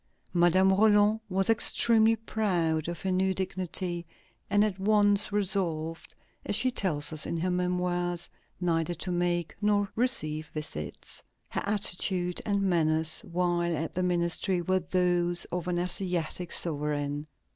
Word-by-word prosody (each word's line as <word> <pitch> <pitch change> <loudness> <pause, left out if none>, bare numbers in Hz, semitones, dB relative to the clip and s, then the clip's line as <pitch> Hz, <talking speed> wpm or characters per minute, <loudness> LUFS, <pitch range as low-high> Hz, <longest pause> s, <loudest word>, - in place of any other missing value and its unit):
Madame 180 +2 +4
Roland 210 +1 +4
was 190 0 0
extremely 225 0 +4
proud 180 -8 -1
of 175 -1 -5
her 190 - -1
new 190 +1 +1
dignity, 185 -2 -3 0.5
and 205 +1 +3
at 200 -3 -2
once 205 0 +3
resolved, 180 -6 -1 0.3
as 205 - -1
she 255 +4 +2
tells 160 -9 +4
us 155 - +3
in 170 - -3
her 180 +3 -1
Memoirs, 180 -1 -1 0.3
neither 175 -1 -1
to 180 +3 -5
make 175 -1 -1
nor 205 -1 +1
receive 155 - +1
visits. 75 - -6 0.3
Her - - -3
attitude 185 -3 0
and 200 -1 0
manners 160 -3 +1
while 175 -1 0
at 160 +2 -4
the 180 - -2
ministry 180 +1 0
were 185 +2 0
those 175 -1 0
of 180 0 -4
an 180 -1 -1
Asiatic 175 -1 -2
sovereign. 145 -2 -2
180 Hz, 135 wpm, -28 LUFS, 170-195 Hz, 0.5 s, Madame